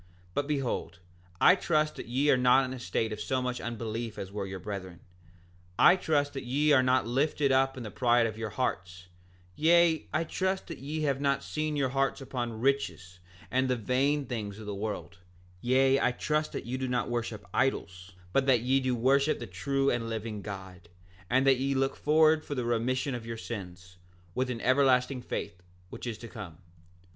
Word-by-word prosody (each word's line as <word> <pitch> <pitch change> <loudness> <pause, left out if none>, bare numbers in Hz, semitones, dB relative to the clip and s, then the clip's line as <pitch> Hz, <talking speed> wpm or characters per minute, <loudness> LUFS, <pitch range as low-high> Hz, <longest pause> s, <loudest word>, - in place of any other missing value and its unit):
7:6 90 - -28 0.3
But 145 +6 -1
behold, 135 -11 -2 0.4
I 180 - +7
trust 155 -5 +1
that - - -7
ye 135 +5 +2
are - - +6
not 125 +1 +4
in 130 - -5
a 130 - -7
state 110 +1 -1
of 105 - -6
so 130 +4 0
much 125 -1 -3
unbelief 115 -1 -4
as 95 - -6
were 100 -1 -4
your 95 0 -5
brethren; 95 -2 -7 0.8
I 180 - +7
trust 145 -6 0
that 135 - -5
ye 145 +5 +1
are 135 -3 +6
not 130 -1 +2
lifted 140 +3 +1
up 135 0 +2
in 125 - -5
the 105 - -7
pride 120 0 +3
of 110 -2 -3
your 110 0 -4
hearts; 90 -6 -3 0.5
yea, 165 0 +4
I 155 - +1
trust 190 +3 -1
that 165 - -7
ye 150 +3 -4
have 140 -2 0
not 140 -1 +1
set 155 0 -2
your 140 -3 +1
hearts 135 +1 0
upon 120 -4 -4
riches 90 - -1 0.3
and 130 +1 +1
the 125 - +2
vain 135 +5 +1
things 105 -5 -5
of 110 - -9
the 105 - -4
world; 100 -1 -5 0.4
yea, 135 +2 +3
I - - +3
trust 150 +4 -1
that - - -5
you 125 +2 -3
do 130 - -2
not 125 -1 0
worship 115 -3 -3
idols, 95 -8 -1 0.2
but 135 0 +2
that 125 -4 +4
ye 130 +3 +2
do 130 -2 0
worship 140 +5 +3
the - - -6
true 135 0 0
and 115 -1 -2
living 110 -2 -4
God, 95 -3 -9 0.4
and 130 +4 +3
that 135 -2 +5
ye 135 +1 0
look 135 +1 +1
forward 155 +1 +4
for 145 - -5
the 125 -2 -2
remission 125 +3 0
of 115 -2 -6
your 115 0 -5
sins, 90 -5 -8 0.4
with 130 +4 -1
an 115 -2 -4
everlasting 130 0 +3
faith, 100 -5 -5 0.3
which - - -7
is 115 -3 -4
to 115 - -9
come. 100 -9 -9
125 Hz, 200 wpm, -29 LUFS, 110-140 Hz, 0.8 s, I